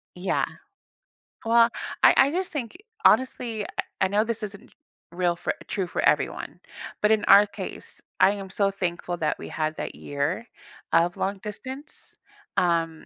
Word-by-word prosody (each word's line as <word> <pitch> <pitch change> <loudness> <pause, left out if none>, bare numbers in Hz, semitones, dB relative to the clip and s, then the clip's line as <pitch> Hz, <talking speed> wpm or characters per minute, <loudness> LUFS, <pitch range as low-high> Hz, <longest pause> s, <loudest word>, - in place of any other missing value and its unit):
Yeah. 180 +2 0 1.0
Well, 230 +1 +5 0.3
I - - +8
I 275 - +6
just 365 +3 -2
think, 270 -2 -5 0.3
honestly, 230 -2 +3
I - - -5 0.4
I - - +4
know 205 +3 +2
this 225 0 -3
isn't 205 +3 -8 0.4
real 175 0 0
for 175 - -2
true 195 - -1
for - - -2
everyone. - - 0 0.4
But 210 - +5
in 220 -1 +3
our 205 +1 +8
case, 205 - -8 0.2
I - - +6
am 200 -2 -6
so 195 +1 +1
thankful 175 -2 -3
that 155 -3 0
we - - -8
had 155 0 -2
that - - -4
year 145 +11 -3 0.5
of 175 +1 +3
long 195 +1 -1
distance, 245 +8 -8 0.4
um 165 -2 +1
200 Hz, 155 wpm, -25 LUFS, 175-225 Hz, 1.0 s, I